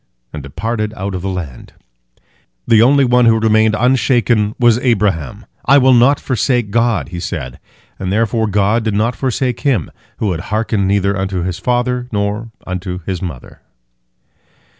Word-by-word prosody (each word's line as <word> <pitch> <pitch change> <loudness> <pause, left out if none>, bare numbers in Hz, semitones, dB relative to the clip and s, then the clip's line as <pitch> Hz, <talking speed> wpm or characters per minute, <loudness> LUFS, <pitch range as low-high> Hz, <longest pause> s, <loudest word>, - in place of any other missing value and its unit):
and 75 - -6
departed 110 - -4
out 100 -1 -4
of 90 - -4
the 95 - -3
land. 85 -10 -7 0.9
The 110 -1 +5
only 135 +3 +4
one 125 0 +3
who 115 -1 +4
remained 110 0 +3
unshaken 120 -4 +2
was 120 -1 +3
Abraham. 100 - -1 0.2
"I 140 +3 +6
will 130 -1 +5
not 125 +4 +4
forsake 125 -4 -1
God," 115 -3 +1
he 90 0 -6
said, 75 -9 -5 0.4
and 95 -1 -3
therefore 110 +1 0
God 105 +3 +1
did 110 -2 -1
not 115 +3 0
forsake 130 -2 -2
him, 125 - 0 0.3
who 105 - -1
had 85 - -3
hearkened 110 -2 0
neither 100 0 +1
unto 95 -2 -2
his 90 -1 -4
father 125 0 -1
nor 105 +2 -2 0.2
unto 90 0 -5
his 95 -2 -3
mother. 80 -10 -8
110 Hz, 160 wpm, -16 LUFS, 95-120 Hz, 0.9 s, I